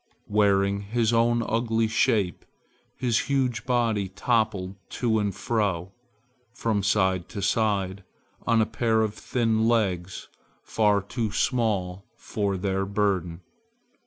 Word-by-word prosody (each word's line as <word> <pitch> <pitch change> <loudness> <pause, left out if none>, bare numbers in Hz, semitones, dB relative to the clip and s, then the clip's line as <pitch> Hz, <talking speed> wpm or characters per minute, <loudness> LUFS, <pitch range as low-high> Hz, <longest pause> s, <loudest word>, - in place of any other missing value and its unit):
Wearing 100 -1 +2
his 115 +3 0
own 115 +1 +3
ugly 115 0 +1
shape, 110 -4 +1 0.5
his 120 -3 +1
huge 130 -4 0
body 115 -6 +1
toppled 100 -2 0 0.2
to 110 -3 0
and 100 -3 -1
fro, 95 -4 -1 0.6
from 110 -5 0
side 95 -3 +1
to 105 - -6
side, 100 -2 0 0.4
on 115 -1 +4
a - - -1
pair 110 0 +1
of 105 -1 -2
thin 115 -2 0
legs 95 -6 0 0.4
far 105 -3 +2
too 110 +1 -3
small 100 -6 0
for 100 -2 -2
their 95 0 -1
burden. 95 -4 -1
105 Hz, 120 wpm, -26 LUFS, 95-115 Hz, 0.6 s, on